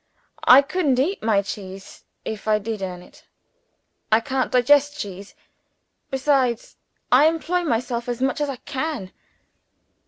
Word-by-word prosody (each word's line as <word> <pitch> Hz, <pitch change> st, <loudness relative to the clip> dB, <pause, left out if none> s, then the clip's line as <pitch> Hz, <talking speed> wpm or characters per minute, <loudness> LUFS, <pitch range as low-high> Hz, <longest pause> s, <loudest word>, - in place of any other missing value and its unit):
"I 265 Hz, +3 st, +9 dB
couldn't 295 Hz, -3 st, 0 dB
eat 325 Hz, +10 st, 0 dB
my 215 Hz, -3 st, +2 dB
cheese, 195 Hz, -1 st, -9 dB, 0.2 s
if 220 Hz, 0 st, -6 dB
I 215 Hz, -1 st, +4 dB
did 210 Hz, 0 st, -5 dB
earn 180 Hz, -2 st, -5 dB
it. -, -, -20 dB, 0.9 s
I 220 Hz, -, +6 dB
can't 260 Hz, +3 st, -2 dB
digest 290 Hz, +4 st, +3 dB
cheese. 200 Hz, -5 st, -8 dB, 0.7 s
Besides, 265 Hz, -3 st, 0 dB, 0.4 s
I 270 Hz, +5 st, +6 dB
employ 330 Hz, +2 st, 0 dB
myself 240 Hz, -3 st, -2 dB
as 240 Hz, 0 st, -3 dB
much 265 Hz, +3 st, -1 dB
as 295 Hz, -, 0 dB
I 275 Hz, -, -3 dB
can." 265 Hz, -7 st, -5 dB
250 Hz, 135 wpm, -22 LUFS, 215-290 Hz, 0.9 s, I